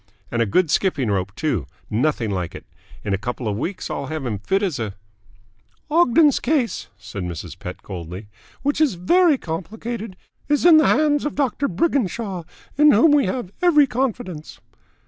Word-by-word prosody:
And 120 Hz, -, 0 dB
a 115 Hz, -, +2 dB
good 155 Hz, -, +2 dB
skipping 140 Hz, -, +1 dB
rope, 95 Hz, 0 st, -2 dB
too. 120 Hz, -, -1 dB, 0.2 s
Nothing 120 Hz, -2 st, 0 dB
like 90 Hz, -3 st, -3 dB
it. -, -, -10 dB, 0.4 s
In 105 Hz, -, -1 dB
a 100 Hz, -, 0 dB
couple 120 Hz, +2 st, -4 dB
of 105 Hz, -, -1 dB
weeks 170 Hz, -, -4 dB
I'll 140 Hz, -, -4 dB
have 155 Hz, -2 st, -4 dB
him 120 Hz, -, -1 dB
as -, -, -29 dB
fit 195 Hz, +1 st, +2 dB
as 170 Hz, -10 st, -1 dB
a 105 Hz, -3 st, -4 dB, 0.5 s
" 105 Hz, -, -35 dB
"Ogden's 305 Hz, -2 st, +4 dB
case," 265 Hz, -4 st, 0 dB
said 100 Hz, -1 st, -7 dB
Mrs. 85 Hz, -3 st, -6 dB
Pett 90 Hz, -, -8 dB
coldly, 90 Hz, +2 st, -7 dB, 0.4 s
"which 285 Hz, +2 st, 0 dB
is 290 Hz, -11 st, +3 dB
very 315 Hz, -, +4 dB
complicated, 215 Hz, +5 st, -5 dB, 0.3 s
is 295 Hz, +2 st, +2 dB
in 335 Hz, -3 st, +9 dB
the 310 Hz, -, +5 dB
hands 295 Hz, -1 st, +3 dB
of 295 Hz, -, -3 dB
Doctor 280 Hz, 0 st, 0 dB
Briginshaw, 200 Hz, -, -1 dB, 0.3 s
in 300 Hz, 0 st, +7 dB
whom 275 Hz, +6 st, +6 dB
we 290 Hz, -8 st, +4 dB
have 195 Hz, -2 st, -3 dB
every 320 Hz, -5 st, +5 dB
confidence." 235 Hz, -, -3 dB
180 Hz, 180 wpm, -22 LUFS, -, 0.5 s, in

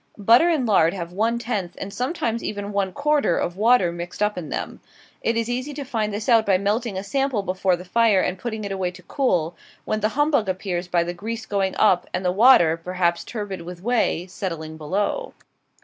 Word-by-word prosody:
Butter 230 Hz, -, +5 dB
and 305 Hz, -7 st, +1 dB
lard 190 Hz, -5 st, +3 dB
have 170 Hz, -2 st, -5 dB
one 225 Hz, +4 st, +1 dB
tenth, 210 Hz, -7 st, -3 dB
and 195 Hz, 0 st, -6 dB
sometimes 245 Hz, -4 st, -2 dB
even 205 Hz, -1 st, -4 dB
one 200 Hz, -2 st, 0 dB
quarter, 285 Hz, -, +1 dB
of 175 Hz, -, -2 dB
water 215 Hz, -3 st, +4 dB
mixed 175 Hz, +4 st, -4 dB
up 210 Hz, 0 st, +1 dB
in 170 Hz, -4 st, -6 dB
them. -, -, -4 dB, 0.4 s
It 230 Hz, 0 st, 0 dB
is 230 Hz, -1 st, 0 dB
easy 255 Hz, +4 st, -3 dB
to 285 Hz, -, -4 dB
find 225 Hz, -5 st, -2 dB
this 210 Hz, +1 st, -4 dB
out 230 Hz, -3 st, +5 dB
by 195 Hz, -3 st, +3 dB
melting 205 Hz, +2 st, -1 dB
a 190 Hz, -, -3 dB
sample 270 Hz, 0 st, -1 dB
before 185 Hz, -1 st, +1 dB
the 180 Hz, +1 st, -10 dB
fire 220 Hz, +1 st, +3 dB
and 180 Hz, 0 st, -1 dB
putting 220 Hz, -1 st, -4 dB
it 200 Hz, -, -4 dB
away 190 Hz, -2 st, -1 dB
to 180 Hz, +1 st, -13 dB
cool, 175 Hz, -, 0 dB, 0.3 s
when 215 Hz, -, -1 dB
the 215 Hz, 0 st, +1 dB
humbug 290 Hz, -8 st, +2 dB
appears 185 Hz, -1 st, -3 dB
by 175 Hz, -1 st, +2 dB
the 175 Hz, +1 st, -4 dB
grease 220 Hz, +5 st, -5 dB
going 195 Hz, -2 st, -1 dB
up, 195 Hz, -4 st, +3 dB
and 185 Hz, -, -3 dB
the 180 Hz, -, +3 dB
water, 185 Hz, -6 st, +6 dB
perhaps 175 Hz, 0 st, -1 dB
turbid 205 Hz, -5 st, -5 dB
with 175 Hz, +1 st, -9 dB
whey, 230 Hz, -7 st, +1 dB
settling 165 Hz, -4 st, -5 dB
below. 200 Hz, -, -2 dB
200 Hz, 210 wpm, -23 LUFS, 180-230 Hz, 0.4 s, water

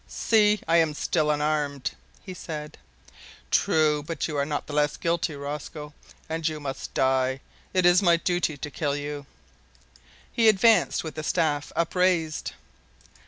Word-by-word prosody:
"See! 210 Hz, -2 st, +3 dB
I 165 Hz, +1 st, +4 dB
am 160 Hz, -2 st, +2 dB
still 150 Hz, +1 st, 0 dB
unarmed," 150 Hz, -2 st, 0 dB, 0.3 s
he 185 Hz, -, -7 dB
said. 155 Hz, -4 st, -7 dB, 0.7 s
"True, 150 Hz, -2 st, +3 dB
but 155 Hz, +1 st, -3 dB
you 155 Hz, -, -5 dB
are 140 Hz, 0 st, 0 dB
not 150 Hz, -1 st, -3 dB
the 150 Hz, -, -8 dB
less 150 Hz, 0 st, +1 dB
guilty, 170 Hz, -2 st, -1 dB
Rosco, 150 Hz, +1 st, -6 dB, 0.3 s
and 160 Hz, 0 st, -2 dB
you 155 Hz, -1 st, -3 dB
must 135 Hz, -2 st, -6 dB
die. 130 Hz, 0 st, +1 dB, 0.3 s
It 185 Hz, -1 st, +2 dB
is 175 Hz, +2 st, +6 dB
my 170 Hz, -3 st, +4 dB
duty 175 Hz, -3 st, -1 dB
to 145 Hz, +2 st, -6 dB
kill 145 Hz, -2 st, -1 dB
you." 145 Hz, -1 st, -5 dB, 1.1 s
He 225 Hz, -2 st, +5 dB
advanced 220 Hz, +2 st, +4 dB
with 160 Hz, -, -6 dB
the 155 Hz, -, -5 dB
staff 150 Hz, -2 st, 0 dB
up 170 Hz, 0 st, 0 dB
raised. 180 Hz, -4 st, +1 dB
155 Hz, 155 wpm, -26 LUFS, 145-170 Hz, 1.1 s, is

